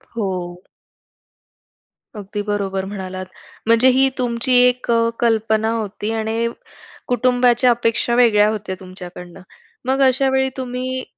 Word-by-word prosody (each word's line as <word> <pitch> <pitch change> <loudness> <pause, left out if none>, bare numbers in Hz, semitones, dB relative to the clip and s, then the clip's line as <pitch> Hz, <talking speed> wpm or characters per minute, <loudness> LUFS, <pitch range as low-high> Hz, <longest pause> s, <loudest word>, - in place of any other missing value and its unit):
हो. 180 -4 -4 1.5
अगदी 205 0 -5
बरोबर 195 -2 -2
म्हणालात. 185 -2 -6 0.4
म्हणजे 230 +3 +5
ही 270 0 +4
तुमची 245 +1 0
एक 250 -1 -2
अ, 230 0 +3
कल्पना 220 -1 +1
होती 215 -1 -3
आणि 225 +1 -1 0.6
कुटुंबाच्या 245 0 +3
अपेक्षा 235 0 0
वेगळ्या 215 -4 +4
होत्या 210 -3 -4
तुमच्याकडनं. 180 -1 -11 0.4
मग 265 +1 +1
अशा 265 +1 +2
वेळी 265 0 +1
तुम्ही 255 0 -4
225 Hz, 115 wpm, -19 LUFS, 200-245 Hz, 1.5 s, म्हणजे